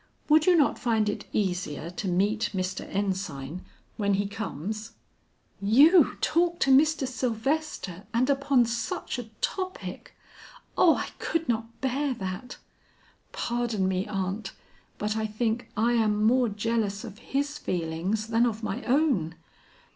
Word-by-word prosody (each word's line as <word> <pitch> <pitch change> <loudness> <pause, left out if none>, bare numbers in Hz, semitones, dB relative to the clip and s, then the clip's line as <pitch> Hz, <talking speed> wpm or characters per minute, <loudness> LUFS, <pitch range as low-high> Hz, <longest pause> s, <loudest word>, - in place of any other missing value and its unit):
Would 310 +2 +5
you 360 - +7
not 295 - +3
find 220 -3 +1
it 205 - -3
easier 180 -5 -2
to 190 +2 -4
meet 205 +4 +1
Mr. 185 0 -3
Ensign 185 -6 -3 0.3
when 200 -2 +2
he 200 +1 0
comes?" 215 +2 -5 0.7
"You 285 - +6
talk 345 +1 +2
to 270 - +4
Mr. 290 0 +4
Sylvester, 250 - -2
and 245 +3 +2
upon 275 -3 +3
such 235 +1 -3
a 245 - -5 0.2
topic! 370 -1 -4 0.6
Oh, 330 - +6
I - - -3
could 330 0 -1
not 230 0 -2
bear 265 +1 0
that. 190 +5 -6 0.7
Pardon 235 -5 -1
me, 190 +1 -1
aunt, 195 0 -3 0.4
but 210 +1 -1
I 220 0 -1
think 225 +2 -2
I 230 +3 +3
am 215 -2 +2
more 245 +2 +4
jealous 210 0 -1
of 215 -3 -9
his 285 +4 -2
feelings 180 - -2
than 230 +1 +3
of 225 -1 -4
my 215 +4 -3
own. 250 - +2
220 Hz, 140 wpm, -27 LUFS, 195-255 Hz, 0.7 s, you